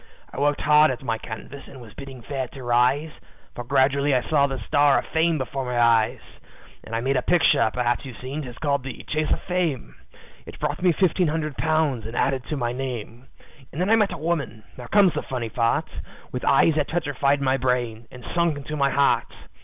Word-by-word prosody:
I - - -6
worked 145 +1 +1
hard 150 +1 +5
at 130 0 -4
my 115 -3 -2
canvas, 120 +6 -9
and 135 - -12
was 115 -4 -13
bidding 135 -3 -10
fair 135 -1 -3
to 135 - -9
rise, 125 +6 +2 0.4
For 120 - -6
gradually 140 +2 +2
I 125 -2 0
saw 140 -3 +3
the 135 -1 -4
star 145 -2 +4
of - - -2
fame 160 0 +1
before 135 0 -3
my 125 -1 -2
eyes. 115 +1 +3 0.7
"I 115 0 -1
made 135 +2 +1
a - - +1
picture 145 -6 +3
perhaps 120 +2 -1
you've 130 -4 -9
seen, 135 +4 -5
'tis 125 -4 -9
called 140 -3 0
the 130 -1 -8
`Chase 155 0 -1
of - - 0
Fame.' 165 - -2 0.5
It - - -10
brought 150 +1 -2
me 180 -1 +4
fifteen 180 0 +2
hundred 155 -2 -2
pounds 155 -8 0
and 115 - -8
added 135 -2 0
to 150 - -4
my 120 -3 -1
name, 125 -1 -6 0.4
And 150 - -7
then 185 +4 +1
I - - +7
met 210 -3 +2
a - - -5
woman 150 -9 -3
now 125 -1 -9
comes 200 0 +4
the - - -2
funny 120 -3 -4
part 115 0 0 0.4
With 125 - -5
eyes 155 +4 +4
that 150 - +1
petrified 145 -4 0
my 135 -1 +1
brain, 120 -3 -1
and 125 -1 -12
sunk 170 -3 +1
into 145 +2 -6
my 140 -2 +2
heart. 140 0 +2
135 Hz, 210 wpm, -24 LUFS, 125-150 Hz, 0.7 s, I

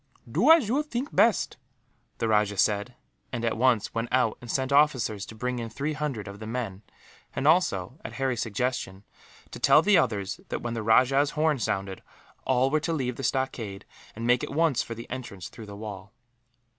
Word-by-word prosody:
"Do - - +2
as 325 -8 +7
you 265 +7 +2
think 285 -2 -4
best," 230 - +3 0.6
the 115 - -1
rajah 105 -2 +2
said 105 +5 +1 0.4
and, 120 -1 -3
at 115 - 0
once, 120 -2 +2
went 115 +1 -2
out 125 -3 +2
and 120 - -10
sent 130 +2 -1
officers 130 -8 +2
to 110 - -10
bring 125 +2 -2
in 115 -1 -4
three 145 +6 -3
hundred 140 -9 -3
of 100 0 -9
the 110 - -7
men; 110 -5 -4 0.5
and 140 - 0
also, 140 - +2
at - - -7
Harry's 130 -3 -1
suggestion, 115 -3 -2 0.5
to - - -8
tell 155 - +6
the 205 -4 +5
others 105 -5 -1
that, - - -4
when 120 -1 -3
the 115 - -3
rajah's 130 +6 +3
horn 155 -3 +2
sounded, 95 -3 -2 0.4
all 130 +1 +2
were 155 - +3
to 165 +2 -2
leave 125 -5 -2
the - - -6
stockade 120 -6 -2 0.3
and 115 +2 -5
make 125 +1 +3
at - - -3
once 155 -3 +2
for 115 - -6
the 115 - -9
entrance 120 -8 -6
through 110 - -11
the 100 - -8
wall. 105 -2 -8
125 Hz, 195 wpm, -27 LUFS, 105-140 Hz, 0.6 s, as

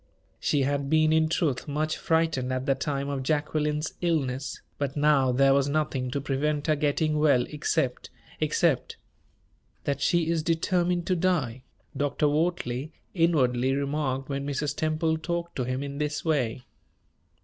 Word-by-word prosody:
She 145 -2 +1
had 140 0 -1
been 155 0 +4
in 160 0 +3
truth 155 -6 0
much 155 +2 -1
frightened 160 -6 0
at 130 0 -2
the 140 - +3
time 140 +1 -2
of 140 -2 -2
Jacqueline's 150 +1 -1
illness; 140 -6 -1 0.2
but, 140 0 -2
now, 145 -3 +4
there 135 +2 +4
was 140 0 +2
nothing 145 -4 -1
to 140 - -2
prevent 145 +2 -1
her 155 - +3
getting 150 +1 +1
well 145 -5 +4
except 150 -3 -1 0.3
except - - +1 0.9
"That 140 -1 -2
she 170 +1 +2
is 165 -1 +1
determined 175 +2 +1
to 185 - +1
die," 160 -9 0 0.3
Dr. 145 +1 0
Wortley 150 -3 -1 0.2
inwardly 135 -7 +2
remarked 140 -1 -1
when 140 -1 -3
Mrs. 145 +1 -2
Temple 160 0 0
talked 170 +1 -3
to 125 - -1
him 130 +2 -2
in 140 0 -6
this 150 +1 -2
way. 130 -6 0
145 Hz, 150 wpm, -27 LUFS, 135-160 Hz, 0.9 s, been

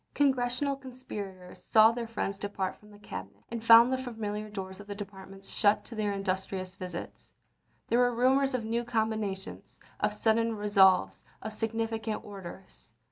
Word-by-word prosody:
Congressional 265 0 +2
conspirators 205 -9 -9
saw 220 0 +6
their 230 0 -4
friends 200 -3 -3
depart 200 -2 -3
from 210 - -19
the 205 - -15
Cabinet, 205 - -9
and 230 -1 -4
found 230 +2 +8
the 260 - 0
familiar 215 -4 -4
doors 190 -2 -6
of 205 - -11
the 205 - -5
departments 195 -1 -9
shut 210 0 +3
to - - -8
their 215 -2 -1
industrious 190 -1 -3
visits. 180 -2 -8 0.6
There 235 - +2
were 245 -1 +3
rumors 265 +2 +3
of 235 -3 -2
new 230 +2 0
combinations, 220 -4 -3 0.2
of - - +1
sudden 230 0 +1
resolves, 190 - +4 0.2
of 220 - -5
significant 225 0 -2
orders. 170 - -11
215 Hz, 155 wpm, -30 LUFS, 195-230 Hz, 0.6 s, found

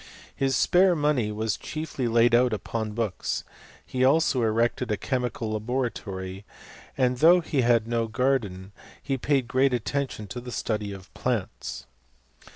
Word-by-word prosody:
His 135 -1 +1
spare 180 +8 +4
money 145 -8 +1
was 110 +1 -1
chiefly 155 -5 -4
laid 115 +1 +4
out 120 0 +4
upon 110 0 -3
books; 110 -4 -2 0.4
he 130 - -6
■ 130 +1 +6
also 150 -4 +2
erected 115 +2 +1
a 105 - +1
chemical 125 -3 -2
laboratory, 105 -5 -3 0.5
and 125 -1 +2
though 170 +6 +7
he 155 -5 0
had 120 -2 +3
no 115 -1 0
garden 110 -6 -1 0.3
he 135 - -2
paid 135 -1 0
great 130 +1 +2
attention 120 0 -3
to 125 +5 -6
the 125 0 -8
study 105 -3 -2
of 95 -2 -11
plants. - - -3
120 Hz, 150 wpm, -26 LUFS, 110-135 Hz, 0.5 s, though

